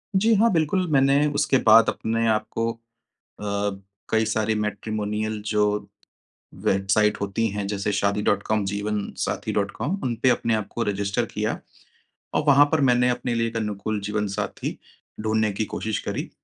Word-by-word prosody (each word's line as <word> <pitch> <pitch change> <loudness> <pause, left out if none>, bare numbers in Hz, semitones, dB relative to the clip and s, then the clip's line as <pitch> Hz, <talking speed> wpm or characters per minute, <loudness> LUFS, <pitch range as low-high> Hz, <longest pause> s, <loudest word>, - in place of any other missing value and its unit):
जी 220 +4 +4
हाँ, 230 +3 +4
बिल्कुल। 180 +2 +1
मैंने 140 +1 +4
उसके 150 -2 +3
बाद 115 +1 +7
अपने 115 +1 -1
आप 110 -1 +1
को 115 0 -1
अ, 115 - -12 1.3
कई 110 0 +2
सारी 110 0 0
मैट्रिमोनियल 105 0 -2
जो 105 -1 +2 1.0
वेबसाइट 95 +2 +2
होती 100 +3 0
हैं 100 0 -3
जैसे 100 0 -2
शादी 100 +1 +1
डॉट 100 -1 +1
कॉम, 110 -1 0
जीवनसाथी 100 +1 -3
डॉट 100 -1 0
कॉम 195 +6 -3
उन 120 -3 -1
पे 130 - +6
अपने 115 -2 +1
आप 110 -2 -3
को 120 - -2
रजिस्टर 100 -1 -1
किया - - -2 0.7
और - - +1
वहाँ 145 0 +7
पर 160 -2 +2
मैंने 125 0 +3
अपने 125 0 -1
लिए 115 0 +1
एक 115 - -4
अनुकूल 105 -1 -2
जीवनसाथी 105 -1 -3 0.4
ढूँढने 110 0 +1
की 110 +2 -1
कोशिश 110 -1 -2
करी। - - -3
110 Hz, 160 wpm, -24 LUFS, 105-120 Hz, 1.3 s, बाद